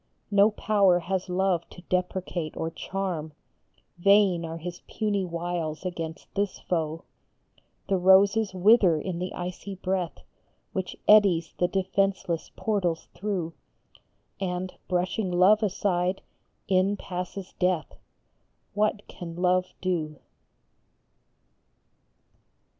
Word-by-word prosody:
No 200 +1 +6
power 200 -4 +3
has 185 +2 -2
Love 180 -2 0
to 175 - -13
deprecate 180 -3 -2
or 160 - -2
charm, 170 -4 -4 0.7
Vain 195 -2 +4
are 165 0 -5
his 175 +2 -7
puny 205 -3 -1
wiles 170 -2 -3
against 165 -3 -5
this 200 -1 -1
foe; 160 -2 -2 0.8
The 195 - +2
roses 195 +3 +5
wither 190 -3 +5
in 175 +1 -4
the 180 +1 -3
icy 180 +2 -5
breath 185 -2 -3 0.5
Which 190 -2 -3
eddies 190 -6 +5
the 180 - +3
defenceless 190 -2 0
portals 185 -6 -1
through, 180 -5 -3 0.9
And, 185 -1 -3
brushing 185 +2 0
Love 185 +5 +5
aside, 190 -2 0 0.4
in 190 +2 +2
passes 180 +1 -6
Death 180 -4 +1 0.8
What 210 0 0
can 170 -2 -8
Love 180 +1 +2
do 160 -5 -1
185 Hz, 105 wpm, -27 LUFS, 175-195 Hz, 0.9 s, No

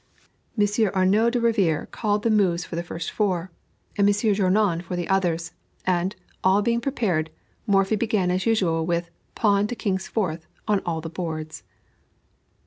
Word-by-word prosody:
Monsieur 205 +1 +2
Arnoux 195 +5 +4
de 245 +1 0
Rivière 205 -10 +1
called 210 -2 -1
the 230 - +2
moves 180 -5 +2
for - - -7
the 170 - -1
first 170 -1 -5
four, 185 -4 -1 0.4
and 200 0 +3
Monsieur 205 +1 +2
Journoud 195 -2 +2
for 180 +1 -5
the 175 -1 -3
others; 175 -3 0 0.3
and, 185 +2 0 0.3
all 190 +2 +4
being 235 +1 +1
prepared, 200 - 0 0.4
Morphy 195 +1 +3
began 210 -5 +1
as 185 +4 -1
usual 180 -8 +2
with 170 +1 -1 0.2
"Pawn 205 -1 +3
to 245 - -4
King's 190 -3 -2
Fourth 165 -7 -2 0.2
on 210 -2 +3
all 165 -2 -1
the 165 - -6
boards." 160 -2 -5
190 Hz, 160 wpm, -24 LUFS, 170-210 Hz, 0.4 s, Arnoux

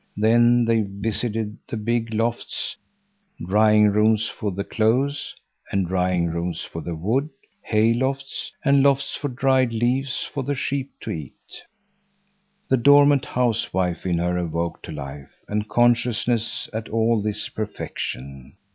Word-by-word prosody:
Then 120 +2 +4
they 115 -1 +3
visited 105 +2 -3
the 115 - -4
big 115 +1 -1
lofts; 115 +2 -2 0.7
drying 105 +2 +5
rooms 110 +1 +3
for 105 - -4
the 100 +2 -3
clothes 130 +8 0 0.4
and 100 -2 +1
drying 90 -1 +1
rooms 85 0 -3
for 80 - -7
the 85 +2 -5
wood; 115 - 0 0.3
hay 110 +1 +2
lofts, 135 +3 -2
and 140 0 +5
lofts 140 0 +2
for 145 - -3
dried 130 -1 +2
leaves 130 +4 0
for 140 - -4
the 140 +2 -2
sheep 135 0 -2
to - - -5
eat. 75 -6 -9 1.1
The 130 - +3
dormant 145 +2 +5
housewife 95 -7 0
in 85 -2 +1
her 90 +1 0
awoke 85 0 -3
to - - -8
life 70 -2 -8
and 105 +1 -2
consciousness 120 -1 +1
at 110 +1 -4
all 115 0 +2
this 105 0 -3
perfection. 70 -10 -6
110 Hz, 140 wpm, -23 LUFS, 95-125 Hz, 1.1 s, drying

